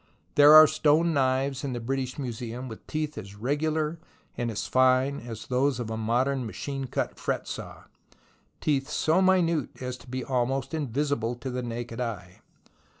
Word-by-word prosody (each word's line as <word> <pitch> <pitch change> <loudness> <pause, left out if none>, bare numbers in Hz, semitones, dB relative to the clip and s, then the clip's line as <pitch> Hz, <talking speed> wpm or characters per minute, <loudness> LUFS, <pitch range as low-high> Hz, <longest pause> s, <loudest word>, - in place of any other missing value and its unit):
There 145 +1 +8
are 155 0 +11
stone 155 +3 +3
knives 135 0 +1
in 135 -2 -2
the 120 - -3
British 130 +2 -3
Museum 125 -1 -5
with 110 -3 -10
teeth 155 -3 -3
as 100 -1 -10
regular 155 +7 -1 0.4
and 120 - -2
as 105 -2 -3
fine 130 +2 +3
as 115 -2 -8
those 130 +1 +1
of 115 -2 -4
a - - -2
modern, 125 +5 0
machine 135 +6 -5
cut 125 - -3
fret - - -2
saw, - - -7 0.8
teeth 140 -1 0
so 160 +4 +2
minute 170 -6 +3
as 125 -1 -4
to 120 - -17
be 130 +1 -4
almost 130 +1 -1
in 155 -3 -1
visible 125 -2 -1
to 130 +2 -6
the 125 0 -3
naked 120 0 -5
eye. 95 -7 -5
130 Hz, 170 wpm, -27 LUFS, 120-145 Hz, 0.8 s, are